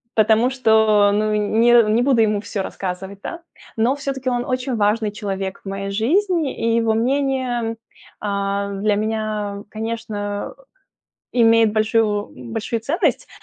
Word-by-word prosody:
потому 220 +3 +4
что, 220 -5 +4
ну, 215 +1 +1
не 225 +3 +4
не 235 - +3
буду 250 -2 +3
ему 210 -2 +2
всё 205 -1 -4
рассказывать, 190 +1 -5
да. 340 - -6 0.4
Но 235 +5 +2
всё-таки 275 -2 -3
он 245 -1 -1
очень 255 0 -2
важный 210 0 +1
человек 195 -2 -4
в - - -5
моей 195 0 -4
жизни, 320 - +1 0.2
и - - +3
его 225 -1 +2
мнение, 260 0 0
м, 225 0 -3 0.4
а, 200 0 -2
для 205 +1 +1
меня, 215 -1 -2
конечно, 215 - -4
э, - - -21 0.8
имеет 225 -1 +5
большую 215 -1 +1 0.2
большую 225 +1 -2
ценность. 290 - 0
220 Hz, 145 wpm, -20 LUFS, 205-240 Hz, 0.8 s, имеет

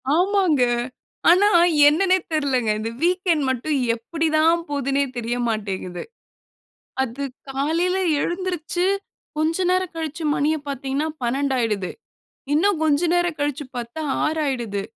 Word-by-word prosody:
ஆமாங்க. 360 -6 +3 0.7
ஆனா, 390 +4 +6 0.4
என்னனே 370 +5 +4
தெர்லங்க. 270 -7 0
இந்த 220 +1 -3
வீக்கெண்ட் 355 -3 +2
மட்டும், 260 +4 -1 0.2
எப்படி 320 +8 -3
தான், 330 +2 +3
போதுனே 280 -1 0
தெரிய 240 0 -2
மாட்டேங்குது. 195 -5 -3 1.0
அது 265 +2 -4 0.3
காலையில 325 +7 0 0.2
எழுந்திருச்சு, 355 0 -2 0.5
கொஞ்ச 320 +2 +1
நேரம் 370 -1 0
கழிச்சு 320 0 -4
மணிய 300 +2 +1
பாத்தீங்கனா, 275 +2 -2
12யிடுது. 240 -6 0 0.6
இன்னும் 370 +3 +2
கொஞ்ச 295 -2 +3
நேரம் 350 -2 +1
கழிச்சு 290 0 -1
பாத்தா, 240 +6 -5 0.2
6யிடுது. 260 -10 -1
300 Hz, 110 wpm, -22 LUFS, 255-340 Hz, 1.0 s, ஆனா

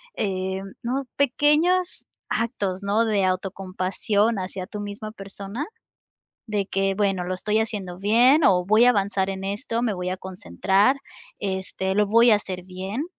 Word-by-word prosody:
eh, 190 -1 -2 0.2
¿no?, 260 +4 -1
pequeños 300 +7 +2 0.2
actos, 200 -5 -2
¿no?, 210 +3 +2
de 210 -3 +1
autocompasión 195 +3 0
hacia 185 0 -5
tu 210 - -7
misma 205 +1 -6
persona? 200 +5 -7 0.8
De 205 -2 -1
que: 195 0 0
"Bueno, 195 -3 +1
lo 185 - -2
estoy 210 +4 0
haciendo 200 -5 -4
bien 240 - +5
o 180 -2 +4
voy 215 +4 +5
a - - +8
avanzar 200 -3 0
en 190 0 -5
esto, 225 +4 -2
me 225 -4 0
voy 180 0 -3
a 185 - -2
concentrar, 190 - +1 0.4
este, 190 -1 -2
lo 210 +1 +3
voy 230 +2 +6
a - - +7
hacer 185 -3 -6
bien". 190 +8 -4
200 Hz, 155 wpm, -24 LUFS, 190-225 Hz, 0.8 s, a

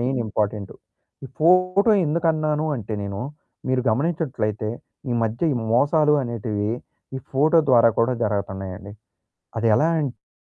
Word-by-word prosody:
Main 130 +2 0
important. 105 -2 -2 0.5
ఈ - - -5
photo 185 +5 +4 0.2
ఎందుకన్నాను 155 -1 0
అంటే 110 -2 -6
నేను 100 0 -5 0.5
మీరు 130 -1 +1
గమనించినట్లయితే 125 - -1 0.4
ఈ - - +1
మధ్య 115 +6 -2
ఈ - - -2 0.2
మోసాలు 150 +4 +3
అనేటివి 110 -3 -3 0.5
ఈ - - -3
ఫోటో 155 +5 +4
ద్వారా 115 -2 +6
కూడా 115 +2 +3
జరగతన్నాయండి. 100 -1 -4 0.7
అది 115 0 +1
ఎలా 155 - +3
అంటే 125 -7 -7
120 Hz, 125 wpm, -22 LUFS, 105-155 Hz, 0.7 s, ద్వారా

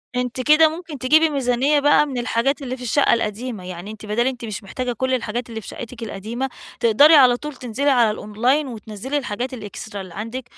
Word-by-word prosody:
أنتِ 250 0 -2
كده 305 +4 +6
ممكن 320 -2 -8
تجيبي 310 +5 +4
ميزانيّة 275 +1 +1
بقى 290 +1 +4
من 275 -4 -5
الحاجات 245 +4 0
اللي 255 -1 -4
في 250 - -10
الشقّة 260 +4 +3
القديمة، 225 -2 -3
يعني 180 +3 -7
أنتِ 220 0 -10
بدال 225 +4 0
أنتِ 250 -3 -3
مش 215 -1 -6
محتاجة 250 +5 -4
كل 260 +3 -1
الحاجات 240 -1 -2
اللي 225 -1 -6
في - - -13
شقتك 235 0 -8
القديمة 230 +5 -4 0.3
تقدري 240 +7 +6
على 255 -4 +6
طول 300 +2 -7
تنزلي 255 +4 -1
على 240 -5 +4
الأونلاين 240 +8 0
وتنزلي 225 +3 -5
الحاجات 250 -1 -3
الإكسترا 210 -2 -7
اللي 185 -3 -10
عندك، 225 +7 -5
245 Hz, 200 wpm, -21 LUFS, 220-275 Hz, 0.3 s, كده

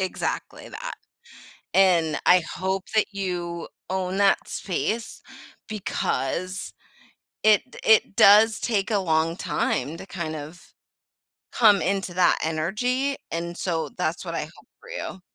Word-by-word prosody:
Exactly 190 -1 -3
that. - - -6 0.8
And 175 -5 +4
I 180 0 +6
hope 190 +1 -1
that 215 - +4
you 175 -3 -4 0.2
own 190 0 -2
that 200 -1 +3
space, 220 +5 -3 0.5
because 185 -3 -3 0.7
it 215 +4 +4
d - - -11
it 220 -2 +4
does 215 +2 +7
take 215 -2 0
a 205 - +2
long 165 -2 +1
time 150 -3 -1
to - - -9
kind 165 -5 -5
of 155 +4 -10 0.8
come 210 -4 +5
into 195 -2 -1
that 180 0 +4
energy, 245 - -1
and 170 +1 -4
so 165 -4 -2
that's 160 +2 -2
what - - -5
I - - -1
hope - - -16
for 480 - -14
you. 190 - -6
190 Hz, 135 wpm, -24 LUFS, 170-210 Hz, 0.8 s, does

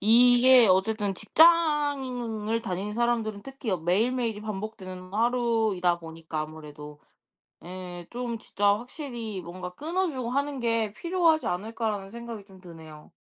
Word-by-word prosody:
이게 245 +2 +7
어쨌든 195 +1 +2
직장을 265 - +2
다니는 200 0 -3
사람들은 225 -3 0
특히 270 -4 -6
매일매일이 220 +6 0
반복되는 190 -3 -7
하루이다 225 -6 +1
보니까 160 -1 -6
아무래도. 150 -1 -9 0.6
예. 180 -1 -8
좀 240 -1 -4
진짜 205 -1 -3
확실히 240 - -6
'뭔가 180 +1 -8
끊어주고 305 - -2
하는 280 0 -1
게 230 -3 0
필요하지 335 +3 +2
않을까.'라는 210 +1 -3
생각이 230 -2 -8
좀 190 -2 -16
드네요. 160 -4 -13
220 Hz, 310 characters per minute, -27 LUFS, 185-245 Hz, 0.6 s, 이게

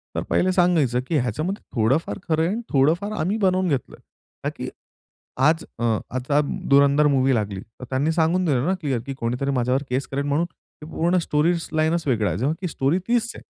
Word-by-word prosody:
तर - - 0
पहिले 185 - +2
सांगायचं, 170 -9 +2
की 160 - +1
ह्याच्यामध्ये 155 - -2
थोडंफार 130 - +1
खरं 160 -1 +2
आहे 165 - +1
आणि 230 +3 -2
थोडंफार 165 +10 +2
आम्ही 190 +8 0
बनवून 185 -2 +2
घेतलं 135 -4 -2
आहे. - - -25 0.4
ता - - +2
की - - -4 0.8
आज 160 +1 +1
अ, - - -5 0.3
आता 140 +3 +1 0.3
धुरंधर 140 +1 +5
मूव्ही 135 -2 +3
लागली, 100 -4 -2
तर 115 +5 -13
त्यांनी 140 +5 +1
सांगून 170 +3 +2
दिलं 135 -6 +1
ना, 190 - +2
क्लिअर, 135 -6 -1
की 135 - -4
कोणीतरी 125 +2 -2
माझ्यावर 130 +1 +1
केस 130 +2 -1
करेल, 140 +1 -3
म्हणून 150 +4 +1
ते 155 -2 -17
पूर्ण 175 +3 +1
स्टोरी 160 0 +2 0.2
लाईनच 160 +1 +1
वेगळा 110 -6 +1
आहे, - - -2
जेव्हा 140 +7 0
की 180 - -2
स्टोरी 145 +4 0
तीच 235 -1 +1
आहे. - - -11
150 Hz, 200 wpm, -23 LUFS, 130-170 Hz, 0.8 s, धुरंधर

